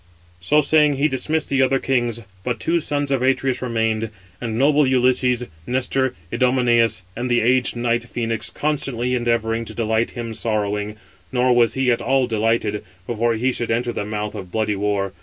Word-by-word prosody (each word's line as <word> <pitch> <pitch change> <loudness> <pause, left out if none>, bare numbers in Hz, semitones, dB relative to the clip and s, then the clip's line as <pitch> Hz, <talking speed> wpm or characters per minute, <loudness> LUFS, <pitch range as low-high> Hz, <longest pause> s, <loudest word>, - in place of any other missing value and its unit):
So 150 +12 +3
saying, 150 0 +4
he 140 +2 +2
dismissed 155 +3 -1
the 135 -1 +2
other 135 +1 +3
kings: 120 -4 0 0.2
but 120 -1 -2
two 170 +8 +1
sons 145 -2 -2
of 135 -2 +1
Atreus 130 0 +1
remained; 115 -2 -1 0.3
and 115 -2 -3
noble 145 +2 +4
Ulysses, 125 -1 +2 0.2
Nestor, 130 +1 0 0.2
Idomeneus, 120 -4 +2
and 125 +2 -3
the 120 0 +3
aged 125 +2 +2
knight 120 0 0
Phœnix, 115 -2 -2
constantly 135 -5 -1
endeavouring 115 -2 0
to - - -8
delight 110 0 0
him 115 -1 -4
sorrowing; 105 -1 -2 0.4
nor 125 -1 +3
was 120 -1 +3
he 130 -1 +2
at 120 - 0
all 130 +2 +2
delighted, 110 -2 0 0.2
before 115 +1 0
he 125 +4 +1
should 120 -1 -3
enter 120 +1 0
the - - -3
mouth 105 0 -3
638] 105 - -5
of 95 -2 -10
bloody 110 0 0
war. 100 -1 -1
120 Hz, 175 wpm, -21 LUFS, 110-130 Hz, 0.4 s, saying